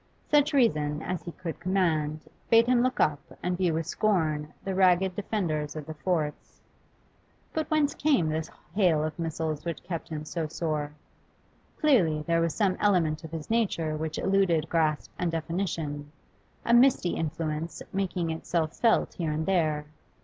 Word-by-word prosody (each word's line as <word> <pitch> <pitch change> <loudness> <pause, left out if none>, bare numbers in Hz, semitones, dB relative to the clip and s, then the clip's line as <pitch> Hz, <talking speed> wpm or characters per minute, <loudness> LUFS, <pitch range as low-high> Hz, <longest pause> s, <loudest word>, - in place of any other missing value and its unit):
Such 295 0 +3
reason 155 - +2
as 185 -1 -3
he 170 - -7
could 170 -1 -6
command 160 -5 0 0.2
bade 230 0 +6
him 245 0 +3
look 255 +1 0
up 145 -2 +3 0.2
and 180 0 0
view 175 -3 +1
with 165 0 -1
scorn 160 -6 0
the 195 - -2
ragged 185 0 +3
defenders 160 -8 -2
of 155 -2 -5
the 160 - -6
forts; 155 -2 -3 0.9
but 315 -1 -2
whence 305 -2 +2
came 275 - +2
this 155 +1 -2 0.2
hail 175 -6 +3
of 155 +1 -4
missiles 160 -2 -2
which 170 -1 -4
kept 170 -2 -5
him 155 -1 -5
so 160 0 -3
sore? 155 -2 -2 0.9
Clearly 180 - +3
there 165 +1 +1
was 165 -1 0
some 195 -4 +1
element 170 -7 +2
of 160 - -7
his 160 +4 -6
nature 180 -9 +1
which 155 0 -3
eluded 175 -5 +2
grasp 155 -3 +1
and 175 -2 0
definition, 160 -3 -3 0.5
a 235 - +3
misty 240 -7 +5
influence 160 0 -3
making 180 -3 -1
itself 160 0 -2
felt 230 -2 +2
here 165 -3 -2
and 155 +1 -1
there. 155 -5 +1
165 Hz, 160 wpm, -28 LUFS, 155-190 Hz, 0.9 s, bade